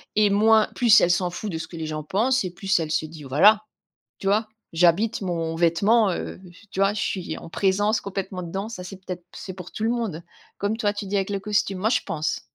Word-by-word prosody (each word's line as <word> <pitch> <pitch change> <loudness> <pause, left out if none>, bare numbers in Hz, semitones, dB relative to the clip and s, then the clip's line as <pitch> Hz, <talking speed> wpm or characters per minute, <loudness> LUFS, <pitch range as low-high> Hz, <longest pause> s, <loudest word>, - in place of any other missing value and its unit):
et 210 -1 +4
moins 215 +2 +4
plus 235 -4 +6
elle 175 - +3
s'en 180 +1 +1
fout 180 +4 -5
de 165 - -3
ce 160 - -6
que 170 - -9
les 160 - -4
gens 155 0 -4
pensent 230 - +1
et 185 - -4
plus 190 +1 0
elle 155 -2 -3
se 160 - 0
dit: 155 -1 -10
«Voilà, 200 +11 +5 0.6
tu 195 - -4
vois, 215 +3 +2 0.3
j'habite 175 +7 +3
mon 165 -3 -2
vêtement, 195 +6 +3
heu, 175 - -5 0.3
tu - - -5
vois? 195 +1 +3
Je 210 - -3
suis 185 -3 -3
en - - -10
présence 205 +4 +1
complètement 190 -1 -5
dedans». 195 +5 -4
Ça, 185 -5 -7
c'est 185 +1 -8
peut 185 -1 -6
être 175 -1 -13
c'est 190 -3 -7
pour 180 -1 -10
tout 215 - -5
le 230 - +2
monde. 225 -9 -2 0.4
Comme 205 +2 -1
toi, 210 -3 +1
tu 205 0 -5
dis 200 +1 -3
avec 195 0 0
le 200 -1 -1
costume. 205 -1 0
Moi, 215 +4 +1
je - - +2
pense. 155 -1 -2
195 Hz, 245 wpm, -24 LUFS, 175-210 Hz, 0.6 s, plus